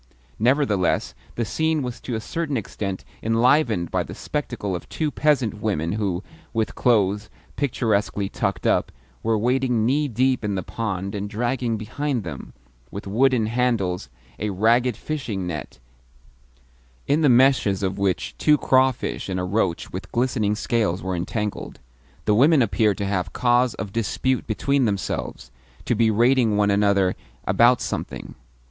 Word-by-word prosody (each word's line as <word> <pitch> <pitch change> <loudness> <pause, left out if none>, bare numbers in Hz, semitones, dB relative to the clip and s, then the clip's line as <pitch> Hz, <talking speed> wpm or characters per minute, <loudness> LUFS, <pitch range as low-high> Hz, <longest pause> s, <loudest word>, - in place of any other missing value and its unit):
Nevertheless 110 - +2 0.2
the 120 - -1
scene 155 +8 0
was 125 -1 -5
to 120 - -4
a - - -1
certain 145 +4 -3
extent 95 -3 -4 0.2
enlivened 115 - +2
by - - +1
the - - -7
spectacle 120 -10 -3
of 85 - -8
two 155 -2 -2
peasant 130 -10 +1
women 85 -7 -1
who, 100 -3 -2 0.3
with 110 -1 -1
clothes 105 -4 +2 0.3
picturesquely 110 -7 0
tucked - - -2
up, - - +2 0.3
were 115 0 +1
wading 125 0 +1
knee 145 +5 +2
deep 130 +1 +1
in 105 -1 -1
the 95 - -2
pond 100 -3 -3
and 100 0 -4
dragging 120 +1 -1
behind 120 +3 -2
them, 85 - -8 0.4
with 100 - -7
wooden 120 +3 +2
handles, 110 - 0 0.3
a 105 - -1
ragged 115 +5 +2
fishing 120 -11 -4
net, 75 -6 -5 1.3
in 150 +3 +2
the 150 - +5
meshes 125 -6 +4
of 95 +1 -1
which 95 -2 -1
two 150 -1 +4
crawfish 130 -6 +1
and 95 -1 -2
a - - -2
roach 90 -2 -1
with - - -6
glistening 115 -4 +1
scales 105 -6 0
were 95 -1 -2
entangled. 105 +4 -4 0.5
The 105 - +3
women 140 +5 +5
appeared 105 -1 +1
to 100 - -2
have 95 -3 -2
cause 120 0 +2
of 100 - -6
dispute 120 +3 -1
between 135 +4 +1
themselves 100 -4 -3 0.3
to - - +1
be 115 0 +3
rating 120 0 +3
one 105 -1 +3
another 100 -2 +2 0.3
about 120 +1 +4
something. - - -5
110 Hz, 150 wpm, -23 LUFS, 100-125 Hz, 1.3 s, the